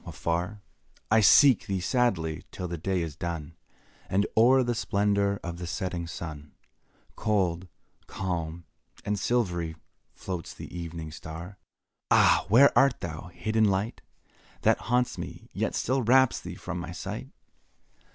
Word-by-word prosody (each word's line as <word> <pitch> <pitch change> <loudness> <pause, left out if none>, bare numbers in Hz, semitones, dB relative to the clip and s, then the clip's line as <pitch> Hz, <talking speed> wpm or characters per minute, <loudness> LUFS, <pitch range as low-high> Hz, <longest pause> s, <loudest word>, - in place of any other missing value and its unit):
Afar 90 +5 -3 0.5
I 110 - +6
seek 130 +4 +6
thee 95 -1 -1
sadly, 90 -7 0
till 90 - -5
the 85 - -4
day 90 +1 0
is 80 -4 -6
done, 85 -2 -5 0.5
And 100 +2 +2
o'er 130 +4 +6
the 120 0 0
splendour 100 -2 +1
of 85 0 -5
the 90 - -5
setting 85 +1 -3
sun, 75 -2 -7 0.6
Cold, 95 -4 0 0.4
calm, 85 -3 -4 0.4
and 105 -1 -1
silvery, 90 -8 0 0.4
floats 90 -4 -6
the - - -9
evening 85 -2 -6
star; 85 +5 -9
Where - - -60
art - - -59
thou? - - +6
Ah! - - +5
where 130 +7 +6
art 135 -1 +4
thou, 85 +1 -6
hid 110 +5 -5
in 110 -1 +5
light 100 +3 0 0.6
That - - +4
haunts 125 0 +1
me, - - -8
yet - - -1
still 130 +2 0
wraps 130 +2 +4
thee - - -7
from 90 - -5
my 85 0 -6
sight? - - -6
95 Hz, 150 wpm, -28 LUFS, 85-110 Hz, 0.6 s, I